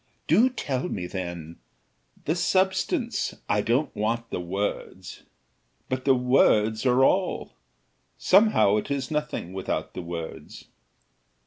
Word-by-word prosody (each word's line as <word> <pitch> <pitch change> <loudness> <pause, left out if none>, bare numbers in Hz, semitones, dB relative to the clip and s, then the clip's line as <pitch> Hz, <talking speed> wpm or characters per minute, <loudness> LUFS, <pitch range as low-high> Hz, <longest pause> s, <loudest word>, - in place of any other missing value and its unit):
"Do 250 +4 +4
tell 145 - -3
me, 90 -3 -4
then, 85 -3 -6 0.7
the 155 - +1
substance; 190 - 0
I 105 0 +2
don't 125 +7 0
want 115 +2 -2
the - - -2
words." 95 +4 -4 0.7
"But 130 0 -3
the 135 -1 +5
words 120 -3 +3
are 125 +1 +4
all. 185 +4 0 0.6
Somehow 185 - +4
it 105 - -3
is 140 -1 -3
nothing 150 - -3
without 95 -1 -3
the - - -5
words." 85 -1 -8
125 Hz, 120 wpm, -25 LUFS, 100-155 Hz, 0.7 s, the